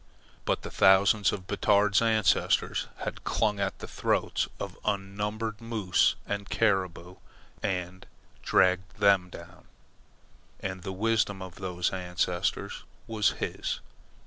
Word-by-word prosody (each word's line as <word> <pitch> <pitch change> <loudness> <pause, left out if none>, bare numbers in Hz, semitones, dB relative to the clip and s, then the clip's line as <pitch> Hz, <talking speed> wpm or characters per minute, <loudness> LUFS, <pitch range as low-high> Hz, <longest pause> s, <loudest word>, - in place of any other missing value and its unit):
But - - 0
the - - -6
thousands 95 +1 +5
of 95 -3 -5
Batard's 100 +1 +3
ancestors 110 -3 +2 0.2
had - - -5
clung 105 -2 0
at 100 -1 -1
the - - -8
throats - - 0
of - - -5
unnumbered 105 +2 -2
moose 110 -6 +2
and 100 -1 -4
caribou 95 -4 0 0.4
and 90 -1 -3 0.3
dragged 95 0 +2
them 100 -3 +4
down, 85 +1 -12 0.9
and 95 -1 -5
the 95 - -5
wisdom 105 -1 0
of 95 -2 -9
those 90 -2 -2
ancestors 90 0 -2 0.2
was 110 -2 +1
his. - - -3
95 Hz, 120 wpm, -28 LUFS, 90-105 Hz, 0.9 s, thousands